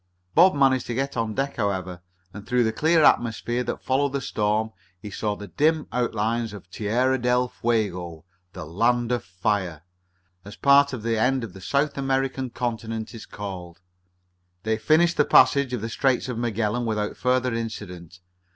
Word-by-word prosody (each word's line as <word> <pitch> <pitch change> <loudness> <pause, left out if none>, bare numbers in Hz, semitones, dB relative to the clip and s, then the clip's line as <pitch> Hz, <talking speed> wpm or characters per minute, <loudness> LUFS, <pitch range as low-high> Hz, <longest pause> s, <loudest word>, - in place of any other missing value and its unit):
Bob 180 +1 +6
managed 135 -3 +2
to 120 - -3
get 135 +2 -2
out - - -6
on 110 -2 -4
deck, 140 +1 -2
however, 95 -4 -2 0.3
and, 105 +1 -10
through 125 -1 +2
the 110 - +1
clear 160 0 +3
atmosphere 120 -1 +2
that 120 - -5
followed 140 +1 +1
the 140 - 0
storm, 110 -2 -1 0.3
he 105 +2 -9
saw 105 +2 -2
the 105 0 -9
dim 155 - +1
outlines 115 -2 -1
of 100 -3 -11
Terra 125 +6 0
del 125 +1 +2
Fuego 90 -10 -2 0.3
"The - - -7
Land 120 +8 +1
of 120 -3 0
Fire" 90 -2 -2 0.6
as 105 - -10
part 140 0 +5
of 125 -5 -6
the 115 -1 0
end 130 +2 +1
of 110 -6 -7
the 95 - -12
South 140 +9 0
American 135 -1 -1
continent 115 -2 -4
is 115 - -10
called. 90 -4 -8 0.8
They 110 0 -1
finished 160 +8 +3
the 150 - +5
passage 140 -2 +5
of 125 -4 -3
the 115 - -3
Straits 130 +2 +1
of 125 - -4
Magellan 115 0 -1
without 105 -1 -2
further 125 -1 +1
incident. 90 -7 -6
115 Hz, 175 wpm, -24 LUFS, 105-130 Hz, 0.8 s, Bob